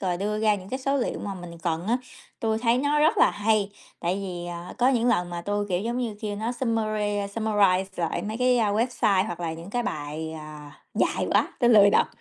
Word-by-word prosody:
rồi 180 -3 0
đưa 210 +3 -2
ra 215 -1 +3
những 190 -2 -8
cái 260 - -3
số 275 +1 0
liệu 255 - -1
mà 200 -1 -5
mình 175 -2 -9
cần 170 +1 -1
á. 235 +3 +2 0.4
Tui 220 -1 0
thấy 235 +1 +2
nó 290 +2 +1
rất 315 +2 +3
là - - +6
hay, 205 -1 +1 0.3
tại 175 +2 0
vì, 180 -3 -5
ờ, 175 0 -7
có 245 - +4
những 245 -2 +2
lần 180 -7 +1
mà 175 0 -4
tui, 205 +3 -2
kiểu 180 -1 0
giống 235 +4 -2
như, 235 -4 -2
kêu 210 -2 -3
nó 225 +3 -2
summary 225 -4 -1 0.3
summarize 205 -4 +3
lại 170 -2 -1
mấy 215 +1 -4
cái, 250 -1 +3
a, 215 -3 +2
website 215 -3 +2
hoặc 175 -3 -5
là 165 -2 -2
những 165 +4 -9
cái 245 +1 0
bài, 155 -6 -4
à, 150 -1 -10 0.2
dài - - +1
quá, - - +3
tôi 240 -1 +5
lười 205 -2 +7
đọc. - - +4
205 Hz, 235 wpm, -26 LUFS, 175-230 Hz, 0.4 s, lười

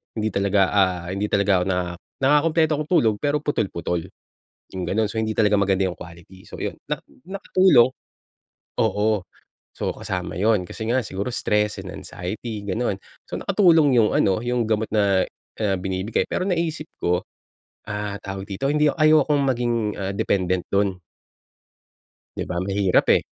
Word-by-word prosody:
hindi 110 -1 -1
talaga, 100 -1 +2
ah, 95 -4 +1
hindi 100 +2 -1
talaga 100 -2 +2
ako - - 0
naka 90 -2 -1 0.3
nakakakumpleto 155 +3 +3
ako - - 0
ng - - -30
tulog, 110 -9 +3
pero 145 0 0
putol 110 -8 0
putol. 85 0 -3 0.8
Yung 90 - -2
ganun. 110 +1 0
So, 110 - -6
hindi 110 0 0
talaga 105 -1 +3
maganda 95 -1 +2
yung 90 - -8
quality. 90 +2 -13
So - - -9
ayun - - -3
na - - -3 0.2
nakatulong. 185 -9 +4 0.9
Oo, 105 -2 +1 0.5
so - - -3
kasama 90 -2 -4
yun 105 -2 +2
kasi 110 - -6
nga 130 +2 +2
siguro 100 +5 -4
stress 105 -1 0
and - - -8
anxiety 105 +5 -6
gano'n. 100 0 -1 0.3
So - - -4
nakatulong 165 - +4
yung 110 -2 +4
ano, 95 -1 +3
yung 120 -1 0
gamot 110 0 0
na, 100 -3 +3 0.4
ah, 100 -3 +1
binibigay. 95 +3 -1
Pero 185 - -1
naisip 165 -4 -1 0.2
ko, 90 +1 +1 0.7
ah, 105 -1 -3
tawag 95 0 -5
dito 120 +8 -2
hindi 150 0 +3
ayokong 155 -2 +4
maging, 120 -2 +1 0.2
ah, 100 0 -2
dependent 95 -3 0
do'n. 100 -2 +1 1.4
'Di - - -2
ba 85 - -3
mahirap 100 -1 +2
eh. - - -1
105 Hz, 160 wpm, -23 LUFS, 95-125 Hz, 1.4 s, nakatulong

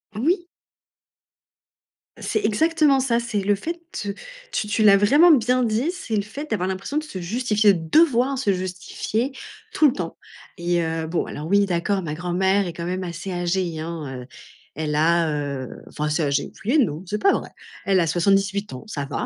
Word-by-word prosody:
Oui. 340 - +1 1.7
C'est 430 - -1
exactement 305 +3 +3
ça, 240 -3 +1
c'est 235 -3 -2
le 205 +1 +2
fait, 335 - -5 0.3
heu, 200 - -2 0.4
tu 210 - -1
tu 215 +1 +1
l'as 200 -2 +7
vraiment 290 - +6
bien 250 -1 +3
dit, 235 +8 0
c'est 360 - -4
le 205 - +2
fait 285 +8 -8
d'avoir 185 -4 0
l'impression 190 +10 -3
de 310 - 0
se 250 -11 -7
justifier, 210 +2 +2
devoir 260 - +3
se 210 -6 +1
justifier 190 +7 -3 0.4
tout 305 - +5
le 255 - +2
temps 170 -3 -5 0.4
et 175 0 0
heu, 160 0 -2
bon 170 +1 -1
alors 150 +2 -6
oui, 200 +2 +4
d'accord, 190 +2 0
ma 155 -4 -4
grand-mère 185 +4 +1
est 170 - -5
quand 170 0 -6
même 185 +1 -3
assez 175 +2 -6
âgée, 175 -2 -1
hein, 155 -6 -5
heu, - - -15 0.5
elle 150 0 -2
a, 165 +1 +3
heu, 140 -4 -3 0.2
enfin, 150 - -4
assez 155 +3 0
âgée, 140 -1 0
oui 230 - +1
et - - +5
non, 160 - +1
c'est 210 +2 -3
pas 395 - +5
vrai. - - -2 0.4
Elle 195 -2 +3
a 165 - +1
78 195 +2 +1
ans, 125 - -8
ça 140 -9 -4
va. 140 - -3
195 Hz, 190 wpm, -23 LUFS, 170-235 Hz, 1.7 s, l'as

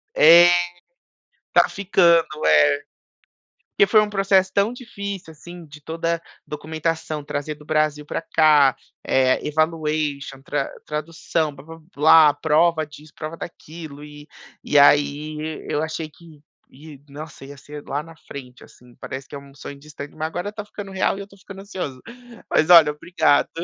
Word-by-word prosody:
É, 170 +3 +8 1.1
tá - - +5
ficando, 175 -4 +3 0.2
é, 75 -1 +6 1.0
porque 200 - +3
foi 215 - +6
um 210 - 0
processo 195 -1 +2
tão 200 +3 +2
difícil, 200 -8 -7
assim, 175 +2 -12
de 150 0 -14
toda 165 +2 -3 0.2
documentação 155 0 -4
trazer 145 +1 -4
do, 150 - -16
Brasil 155 -1 0
pra - - -4
cá, 155 -4 +4 0.7
evaluation 150 -3 -2
tra 140 0 -3 0.2
tradução, 155 0 -3
blá 135 0 -14
blá 165 +1 -12 0.2
blá, 150 0 +6
prova 160 +1 +2
disso, 150 +1 -15
prova 155 +1 -6
daquilo 155 -3 -10
e 150 0 -13 0.3
e 145 - +2
aí 145 +2 +3 0.3
eu 150 - -1
achei 160 0 -4
que, 155 0 -18 0.7
nossa, 145 0 -10
ia 140 +1 -11
ser 145 +2 -11
lá 140 - -2
na 165 0 -14
frente, 125 -3 -10
assim, 125 -1 -20
parece 135 0 -7
que - - -12
é 140 - -5
um 140 0 -15
sonho 140 0 -9
distante, 145 0 -10
mas 155 0 -3
agora 175 +5 -5
tá 210 -1 -7
ficando 205 -1 -9
real 190 0 0
e - - -7
eu - - -10
tô 195 - -19
ficando 195 0 -12
ansioso, 180 -10 -6 0.5
mas 155 +3 +1
olha, 165 -4 +8
obrigado, 155 -1 +1
155 Hz, 155 wpm, -22 LUFS, 145-170 Hz, 1.1 s, É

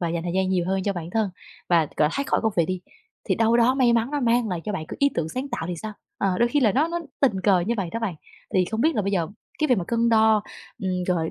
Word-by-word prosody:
và 170 - -1
dành 165 0 -2
thời 175 0 -3
gian 190 0 +1
nhiều 180 -2 +1
hơn 190 0 0
cho 200 - 0
bản 175 -2 -6
thân 220 -2 0 0.4
và 170 -2 +5
gọi 150 - +3
thoát 280 - -1
khỏi - - +1
công 220 -1 +1
việc 170 -2 +3
đi, 185 +1 -3 0.5
thì - - +3
đâu 225 +1 +3
đó 240 +2 +4
may 255 -3 +3
mắn 235 +3 +1
nó 290 - -1
mang 235 -2 +2
lại 175 -3 -2
cho 210 - -3
bạn 160 -5 -4
có - - -6
ý 280 0 +4
tưởng 160 -1 -1
sáng 255 +10 -4
tạo 240 -9 -4
thì 180 - -2
sao? 215 +6 -6 0.3
Ờ, 190 -2 0
đôi 235 0 +3
khi 290 +3 +1
là 220 -5 +4
nó 300 +8 +2
nó 345 0 -2 0.2
tình 230 -9 +2
cờ 190 -2 +4
như 225 +7 -1
vậy 195 -4 -2
đó 230 - -3
bạn. 215 -6 -2 0.4
Thì 185 - +4
không 220 +1 -2
biết 320 +5 +3
là 210 - +1
bây 200 +1 -2
giờ 170 -4 0 0.3
cái 305 - +1
việc 250 -4 +4
mà 180 - -2
cân 235 0 +2
đo, 220 -2 +4 0.4
ừm, 185 -1 -1
rồi 165 -3 0
210 Hz, 310 wpm, -24 LUFS, 180-235 Hz, 0.5 s, và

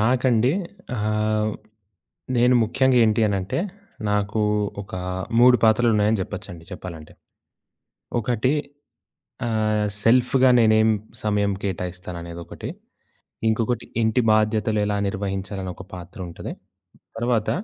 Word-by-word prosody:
నాకండి 125 +1 +3 0.4
ఆహ్, 110 0 0 0.9
నేను 125 +1 +5
ముఖ్యంగా 130 +3 +2
ఏంటి 110 +1 +2
అనంటే, 100 - -1 0.5
నాకు 105 +1 0 0.4
ఒక 100 - -13 0.5
3 125 0 +7
పాత్రలున్నాయని 110 -1 +4
చెప్పొచ్చండి 90 -4 -7
చెప్పాలంటే. 85 -4 -8 1.1
ఒకటి 125 +2 +1 1.0
ఆహ్, 110 -2 +1 0.2
సెల్ఫ్‌గా 125 +3 +4
నేనేం 110 -1 +5 0.3
సమయం 105 -1 +1
కేటాయిస్తాను 90 -1 -4
అనేదొకటి, 85 0 -8 0.8
ఇంకొకటి 115 +1 0 0.2
ఇంటి 110 +3 +2
బాధ్యతలు 110 0 +2
ఎలా 105 0 0
నిర్వహించాలనొక 95 -1 -4
పాత్ర 90 +1 -9
ఉంటది, 85 - -7 0.7
తర్వాత 115 -2 0
110 Hz, 90 wpm, -23 LUFS, 100-115 Hz, 1.1 s, 3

